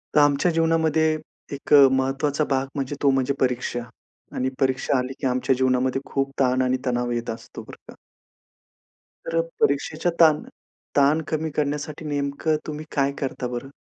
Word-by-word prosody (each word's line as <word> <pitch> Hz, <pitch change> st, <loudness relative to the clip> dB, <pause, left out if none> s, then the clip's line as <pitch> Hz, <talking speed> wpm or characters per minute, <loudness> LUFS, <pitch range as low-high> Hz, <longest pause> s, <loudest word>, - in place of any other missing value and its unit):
तर -, -, +7 dB
आमच्या 145 Hz, +4 st, +3 dB
जीवनामध्ये 160 Hz, -1 st, +2 dB, 0.4 s
एक 140 Hz, +1 st, -2 dB, 0.2 s
महत्त्वाचा 135 Hz, +3 st, 0 dB
भाग 135 Hz, -1 st, 0 dB
म्हणजे 140 Hz, 0 st, -3 dB
तो 140 Hz, -, +5 dB
म्हणजे 135 Hz, 0 st, +1 dB
परीक्षा 125 Hz, -1 st, 0 dB, 0.6 s
आणि 130 Hz, +1 st, 0 dB
परीक्षा 130 Hz, 0 st, +1 dB
आली, 130 Hz, +1 st, -2 dB
की 135 Hz, -, 0 dB
आमच्या 130 Hz, +1 st, +1 dB
जीवनामध्ये 130 Hz, +1 st, +1 dB
खूप 135 Hz, 0 st, -2 dB
ताण 130 Hz, -1 st, +3 dB
आणि 130 Hz, 0 st, +1 dB
तणाव 120 Hz, -1 st, 0 dB
येत 120 Hz, 0 st, -3 dB
असतो, 115 Hz, 0 st, -7 dB
बरं -, -, -13 dB
का. -, -, -15 dB, 1.3 s
तर 165 Hz, 0 st, 0 dB, 0.2 s
परीक्षेच्या 155 Hz, +4 st, +1 dB
ताण 155 Hz, -3 st, +6 dB, 0.6 s
ताण 145 Hz, +3 st, +4 dB
कमी 160 Hz, 0 st, -2 dB
करण्यासाठी 150 Hz, +1 st, -2 dB
नेमकं 145 Hz, +1 st, -1 dB
तुम्ही 155 Hz, 0 st, -5 dB
काय 140 Hz, -1 st, +1 dB
करता 130 Hz, -2 st, -3 dB
बरं? 125 Hz, +2 st, -6 dB
140 Hz, 150 wpm, -23 LUFS, 130-150 Hz, 1.3 s, तर